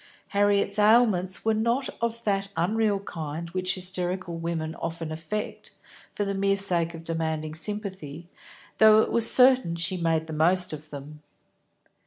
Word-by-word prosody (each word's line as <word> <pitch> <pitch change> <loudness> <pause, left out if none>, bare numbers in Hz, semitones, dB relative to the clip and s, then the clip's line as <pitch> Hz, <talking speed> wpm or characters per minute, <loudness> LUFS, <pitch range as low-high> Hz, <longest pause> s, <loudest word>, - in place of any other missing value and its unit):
Harriet's 200 0 +2
ailments 210 -4 +3
were 220 - +3
not 235 +5 0
of 235 0 -2
that 195 -1 -1
unreal 205 +4 +1
kind 165 -2 -6
which 185 0 0
hysterical 180 -1 -3
women 165 -1 -4
often 165 -1 -4
affect, 165 +7 -5 0.4
for 205 - -3
the 200 - -2
mere 195 0 +1
sake 175 -4 -1
of 165 - -10
demanding 160 -2 -3
sympathy, 175 -4 -5 0.5
though 220 0 +7
it - - -4
was 230 -1 +5
certain 255 -9 +5
she 170 +2 -1
made 165 -2 0
the 160 - -8
most 175 +3 +2
of 155 0 -9
them. 150 +1 -10
185 Hz, 150 wpm, -26 LUFS, 165-205 Hz, 0.5 s, though